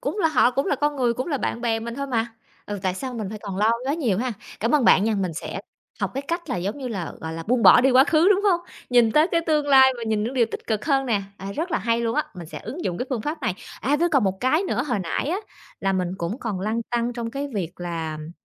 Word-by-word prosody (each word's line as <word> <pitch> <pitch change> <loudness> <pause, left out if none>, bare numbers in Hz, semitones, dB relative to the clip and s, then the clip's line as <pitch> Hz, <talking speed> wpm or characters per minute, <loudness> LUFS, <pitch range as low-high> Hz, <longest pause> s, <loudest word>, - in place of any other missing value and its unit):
cũng 465 -4 -3
là 330 - +3
họ 255 -5 +4
cũng 275 +3 -1
là - - +1
con 295 +1 0
người, 245 -3 +1
cũng 255 - -3
là 295 -5 -1
bạn 235 - -2
bè 225 -2 0
mình 235 +1 -5
thôi 280 +2 -3
mà. 235 -2 -1 0.3
Ừ, 205 -1 -4
tại 185 -1 0
sao 255 +5 -5
mình 215 -4 -4
phải 215 - -6
toàn 200 -3 -5
lo 215 +3 +3
quá 280 - +1
nhiều 235 - 0
ha? 250 0 -1 0.3
Cảm 230 +7 +1
ơn 285 - +3
bạn 195 - +6
nha, 220 0 +1
mình 190 -4 -1
sẽ - - -5 0.4
học - - 0
cái 275 - -2
cách 340 0 -3
là 250 - 0
giống 195 +9 -3
như 260 -2 -4
là, 195 -7 -4
gọi 160 0 -5
là, 165 0 -5
buông 240 +6 +1
bỏ - - +9
đi 270 - +4
quá 260 +1 +7
khứ, 320 +4 +4
đúng 405 -1 +4
hông? 365 -4 +3 0.3
Nhìn 240 -3 +5
tới 305 +2 +5
cái 335 - +3
tương 305 -2 +2
lai 265 -2 +7
và 235 - -7
nhìn 220 -1 0
những 245 - -3
điều 240 -3 +3
tích - - -7
cực 215 -2 -1
hơn 275 -3 +2
nè. 210 -4 +1
À, 195 0 -6
rất 330 - -3
là 330 - +1
hay 230 0 0
luôn 230 -1 -1
á! - - +2
Mình 175 -3 -8
sẽ - - -7
ứng 270 - -7
dụng 175 - -2
cái 250 - -2
phương 240 -5 -1
pháp 300 +2 -4
này. 185 - 0 0.3
À, 285 +3 +2
với 340 +3 +2
còn 275 -8 +3
một 190 -1 0
cái 285 +8 +2
nữa, 245 - -1
hồi 245 -6 0
nãy 190 - -2
á, 355 - 0 0.4
là 195 0 +1
mình 185 -2 0
cũng 175 +8 -3
còn 210 -8 -3
lăn 220 +4 -1
tăn 240 0 0
trong 235 -1 -4
cái 280 +2 -4
việc 180 -5 -2
là, 165 -3 -3
ừm, 155 +1 -8
240 Hz, 300 wpm, -24 LUFS, 205-280 Hz, 0.4 s, bỏ